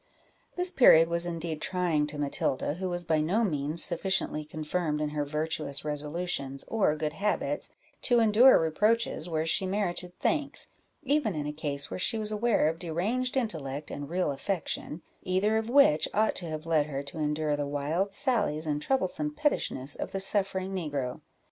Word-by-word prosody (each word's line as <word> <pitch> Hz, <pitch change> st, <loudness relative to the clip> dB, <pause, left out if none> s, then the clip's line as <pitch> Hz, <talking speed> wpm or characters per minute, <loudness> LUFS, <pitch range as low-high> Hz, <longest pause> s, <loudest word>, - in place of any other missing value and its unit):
This 360 Hz, 0 st, +1 dB
period 165 Hz, -10 st, +7 dB
was 170 Hz, +1 st, +2 dB
indeed 165 Hz, -2 st, -4 dB
trying 170 Hz, -5 st, 0 dB
to 150 Hz, 0 st, -7 dB
Matilda, 140 Hz, -1 st, -1 dB
who 185 Hz, +3 st, -4 dB
was 175 Hz, 0 st, -3 dB
by 160 Hz, -1 st, +2 dB
no 190 Hz, +9 st, +1 dB
means 150 Hz, -3 st, +1 dB
sufficiently 175 Hz, -3 st, 0 dB
confirmed 155 Hz, +1 st, -2 dB
in 150 Hz, 0 st, -1 dB
her 150 Hz, 0 st, -2 dB
virtuous 150 Hz, -1 st, -3 dB
resolutions, 150 Hz, -2 st, -3 dB
or 200 Hz, -9 st, +2 dB
good 150 Hz, 0 st, -3 dB
habits, 205 Hz, +6 st, -1 dB, 0.3 s
to 245 Hz, -2 st, +3 dB
endure 230 Hz, +4 st, +7 dB
reproaches 180 Hz, +2 st, +1 dB
where 160 Hz, -1 st, -1 dB
she 185 Hz, +4 st, +1 dB
merited 180 Hz, -2 st, -2 dB
thanks, 300 Hz, -3 st, -1 dB, 0.3 s
even 275 Hz, -, +1 dB
in 150 Hz, -1 st, -3 dB
a 150 Hz, -, -3 dB
case 145 Hz, -2 st, -2 dB
where -, -, -4 dB
she 225 Hz, -, +2 dB
was 215 Hz, -1 st, 0 dB
aware 215 Hz, -6 st, +2 dB
of 160 Hz, +1 st, -2 dB
deranged 215 Hz, +11 st, -1 dB
intellect 150 Hz, -, -3 dB
and 145 Hz, 0 st, -6 dB
real 180 Hz, -3 st, 0 dB
affection, 160 Hz, +1 st, -4 dB, 0.2 s
either 195 Hz, +4 st, +1 dB
of 220 Hz, +1 st, -2 dB
which 250 Hz, -, +5 dB
ought 215 Hz, +1 st, +3 dB
to 175 Hz, -, -5 dB
have 155 Hz, 0 st, -5 dB
led 155 Hz, -3 st, +2 dB
her 140 Hz, -2 st, -4 dB
to 150 Hz, +3 st, -7 dB
endure 150 Hz, 0 st, 0 dB
the 145 Hz, -1 st, -2 dB
wild 150 Hz, +7 st, -1 dB
sallies 210 Hz, -, 0 dB
and 150 Hz, -1 st, -1 dB
troublesome 270 Hz, -, 0 dB
pettishness 290 Hz, -, -1 dB
of -, -, -5 dB
the 195 Hz, -, -1 dB
suffering 195 Hz, -1 st, 0 dB
negro. 145 Hz, -8 st, -3 dB
165 Hz, 175 wpm, -29 LUFS, 150-205 Hz, 0.3 s, period